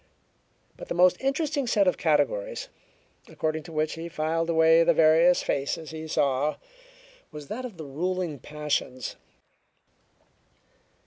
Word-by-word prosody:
But - - -9
the - - -3
most 180 +1 +4
interesting 275 0 -1
set 205 -4 +2
of 180 - +3
categories, - - 0 0.6
according 155 0 -3
to 170 - -10
which 155 0 -1
he 165 +1 -7
filed 165 +1 -1
away 160 0 +5
the - - +3
various 165 +2 +5
faces 145 +3 -2
he 160 0 -7
saw 140 0 +1 0.8
was 150 -2 -10
that 250 +4 -5
of 225 -8 -9
their 160 - -7
ruling 170 +1 -3
passions. 145 -5 -3
165 Hz, 130 wpm, -26 LUFS, 155-185 Hz, 0.8 s, away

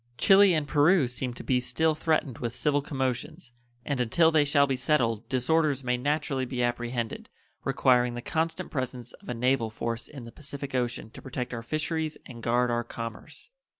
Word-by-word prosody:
Chili 195 -2 +6
and 150 -2 -1
Peru 150 0 +4
seem 125 +1 -2
to - - -8
be 125 -1 +2
still 160 +5 +1
threatened 155 -5 0
with 120 -1 -3
civil 145 -1 +2
commotions, 135 +1 -3 0.3
and 140 -3 -1
until 160 +8 +4
they 155 -2 +4
shall 140 -1 +4
be 135 -1 -1
settled 120 -6 +1
disorders 140 +2 +1
may 125 0 +1
naturally 135 0 -1
be 125 -1 -2
apprehended, 120 -1 -2 0.3
requiring 125 -1 +3
the 120 - -4
constant 165 +1 -2
presence 130 -3 -4
of - - -14
a 125 - -2
naval 125 -1 +1
force 115 +2 -4
in 135 -5 -10
the 115 - -10
Pacific 140 0 -7
Ocean 120 -3 -2
to - - -10
protect 125 -1 -5
our 115 - -4
fisheries 155 +4 -2
and 120 -2 -10
guard 120 +1 +2
our 120 0 0
commerce. 115 - -8
130 Hz, 185 wpm, -28 LUFS, 120-150 Hz, 0.3 s, Chili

